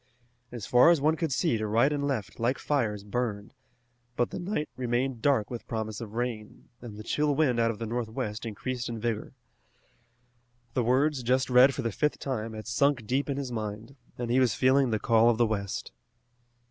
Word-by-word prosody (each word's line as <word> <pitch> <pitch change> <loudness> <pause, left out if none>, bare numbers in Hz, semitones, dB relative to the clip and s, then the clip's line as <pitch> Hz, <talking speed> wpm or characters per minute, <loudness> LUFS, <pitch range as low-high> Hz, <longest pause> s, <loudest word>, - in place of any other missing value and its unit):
As 120 -5 -6
far 125 +6 +6
as 170 -3 +5
one 155 +3 +2
could 160 -2 -2
see 115 -3 +1
to 110 - -2
right 115 +7 +3
and 145 -1 -1
left 110 -10 -3
like 120 +3 +1
fires 110 -9 -1
burned, 105 -1 -3 0.6
but 120 - 0
the - - -5
night 175 -4 -2
remained 125 0 -1
dark 130 -6 +2
with 115 -3 -6
promise 110 -1 -4
of 110 -1 -8
rain, 115 -3 -4
and 115 -4 -9
the 110 - -8
chill 150 +4 +1
wind 135 -5 +2
out 115 0 +3
of 115 - -3
the 115 - -4
northwest 110 -2 -3
increased 120 +2 -4
in 115 -1 -4
vigor. 115 -1 -3 1.4
The 125 - +1
words 135 +4 +2
just 130 +2 +1
read 130 +2 +6
for 135 - -3
the 115 - -1
fifth 150 +8 0
time 115 -5 -4
had 110 0 -7
sunk 130 +1 +1
deep 135 +6 -1
in 140 - -1
his 135 -3 -4
mind, 110 +3 -5 0.2
and 120 -1 -3
he 125 - +4
was 130 -3 +3
feeling 130 0 +3
the 110 - +1
call 115 +1 +4
of 115 - +2
the 120 - +4
west. 100 -3 -3
120 Hz, 200 wpm, -28 LUFS, 110-135 Hz, 1.4 s, far